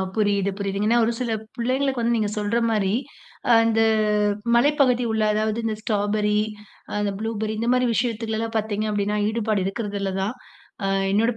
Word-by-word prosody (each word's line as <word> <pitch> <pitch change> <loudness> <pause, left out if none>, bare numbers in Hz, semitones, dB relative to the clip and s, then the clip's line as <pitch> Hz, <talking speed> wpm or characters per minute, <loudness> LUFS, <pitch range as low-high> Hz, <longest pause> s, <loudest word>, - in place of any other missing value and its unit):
புரியுது, 200 -2 +1
புரியுது. 200 0 -2
ஏன்னா 235 +2 +4
ஒரு 230 - +1
சில 245 -2 -2 0.3
பிள்ளைங்களுக்கு 260 +2 0
வந்து 235 +1 +2
நீங்க 215 -2 0
சொல்ற 210 +2 0
மாரி, 205 -3 +1 0.6
அந்த 225 0 +3 0.8
மலைப்பகுதி 255 -1 +3
உள்ள 220 -1 +1
அதாவது, 215 +1 0
இந்த 220 -1 -1
ஸ்ட்ராபெர்ரி, 210 0 +1 0.6
அந்த 205 -1 0
ப்ளூபெர்ரி 220 -1 -2
இந்த 230 - -1
மாரி 250 0 +2
விஷயத்துலலாம் 225 -1 -2
பார்த்தீங்க 215 0 -1
அப்படினா, 205 0 0
ஈடுபாடு 220 -2 0
இருக்கிறதுல்லதான். 200 0 -2 0.5
அ - - +1 0.2
என்னோட 220 +4 +3
220 Hz, 145 wpm, -23 LUFS, 205-230 Hz, 0.8 s, ஏன்னா